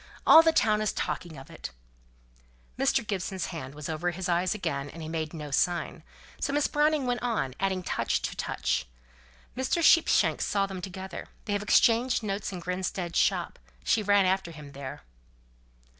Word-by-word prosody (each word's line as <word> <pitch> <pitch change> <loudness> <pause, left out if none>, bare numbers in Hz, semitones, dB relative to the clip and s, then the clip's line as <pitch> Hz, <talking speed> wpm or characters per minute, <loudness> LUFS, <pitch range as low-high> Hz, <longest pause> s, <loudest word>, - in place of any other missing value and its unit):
All 320 - +10
the 325 0 +4
town 215 -8 +2
is 215 - +1
talking 170 -4 -4
of 135 - -12
it." - - -7 1.1
Mr. 225 - +1
Gibson's 190 -2 -3
hand 140 -4 -7
was 150 -1 -6
over 160 +2 -1
his 180 +2 -4
eyes 175 +3 +1
again, 140 -8 -3
and 165 - -11
he - - -6
made 160 -1 -3
no 150 -3 -7
sign; 175 +5 0 0.4
so - - -1
Miss 290 0 +2
Browning 295 -1 +2
went 245 -1 -1
on, 225 - -1
adding 190 -1 0
touch - - 0
to - - -3
touch. - - -2 0.7
"Mr. 260 +6 0
Sheepshanks 330 +1 +4
saw 200 -1 +1
them 190 -2 -6
together. 190 0 -7 0.2
They 205 - -2
have 205 - 0
exchanged 235 +3 +3
notes 200 -1 -3
in 180 -2 -6
Grinstead's 180 0 -2
shop; - - 0 0.2
she 220 - +2
ran 205 -1 +4
after 190 -1 +1
him 150 -3 -11
there." 135 -1 -8
190 Hz, 175 wpm, -28 LUFS, 165-215 Hz, 1.1 s, All